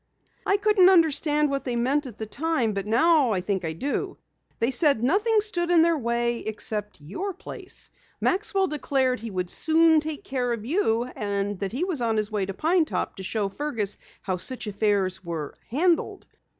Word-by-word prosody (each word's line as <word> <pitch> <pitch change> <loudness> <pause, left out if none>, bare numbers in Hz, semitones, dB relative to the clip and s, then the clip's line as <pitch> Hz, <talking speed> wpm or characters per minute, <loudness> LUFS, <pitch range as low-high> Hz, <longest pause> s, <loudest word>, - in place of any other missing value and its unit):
"I 395 - +4
couldn't 405 -2 +5
understand 300 -4 +3
what 275 0 -2
they 245 -2 -2
meant 265 +4 0
at 235 - -10
the 220 - -4
time, 265 -2 -1
but 200 0 -4
now 275 +2 +4
I 185 - 0
think 190 0 -2
I 160 -1 -3
do. 275 - -3 0.4
They 230 +3 +1
said 280 +1 +3
that 225 - -7
nothing 420 - +3
stood 350 -5 0
in 340 -2 +5
their 335 0 +3
way 235 -1 0
except 210 -2 -2
your 345 - -5
place. - - -7 0.3
Maxwell 390 0 +1
declared 270 - 0
he 230 +1 -6
would 180 -3 -3
soon 320 0 +4
take 305 -1 -4
care 250 -2 -1
of 220 -2 -6
you, 240 - +1
and 200 -1 -2
that 195 -1 -3
he 265 +9 -2
was 360 -8 -1
on 225 -2 +1
his 215 0 -1
way 200 -3 -1
to 195 - -4
Pine 330 - +2
Top - - -3
to - - -7
show 205 +2 -2
Fergus 220 -3 -2 0.2
how 185 -2 -2
such 255 +8 -2
affairs 200 -3 0
were 165 -4 -5 0.2
handled." 330 +7 0
250 Hz, 190 wpm, -25 LUFS, 210-325 Hz, 0.4 s, couldn't